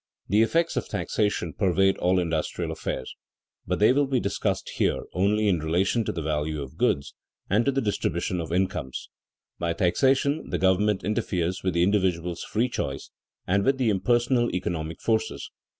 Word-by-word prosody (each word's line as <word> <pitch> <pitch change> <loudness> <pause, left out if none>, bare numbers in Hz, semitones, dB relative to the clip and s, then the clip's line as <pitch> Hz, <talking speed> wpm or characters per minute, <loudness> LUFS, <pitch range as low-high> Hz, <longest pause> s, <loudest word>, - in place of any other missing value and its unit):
The 105 +3 +4
effects 165 +9 +2
of - - -1
taxation 105 -6 -1
pervade 95 0 +2
all 90 +1 +2
industrial 80 -3 -1
affairs, 65 - -4 0.5
but - - 0
they 105 +4 +5
will 145 +1 +2
be 130 -2 +1
discussed 100 - -2
here - - +1
only 105 +3 +2
in 90 -4 +2
relation 90 +9 +1
to - - -1
the 85 -2 -4
value 75 -1 -2
of 65 - -11
goods 70 0 0 0.4
and 110 +4 +3
to 140 - +3
the 135 0 0
distribution 90 -5 -1
of 80 -1 -6
incomes. 90 -8 -2 0.5
By 85 -1 0
taxation 135 - +1
the - - -1
government 95 +2 +2
interferes 90 -4 -1
with 95 -2 -1
the 85 - +3
individual's 90 -3 0
free 115 +4 0
choice 70 - -4 0.3
and 100 +2 +2
with 135 +3 +2
the 125 -4 +2
impersonal 120 +4 +2
economic 80 -3 -3
forces. 110 -1 -1
95 Hz, 165 wpm, -26 LUFS, 85-110 Hz, 0.5 s, they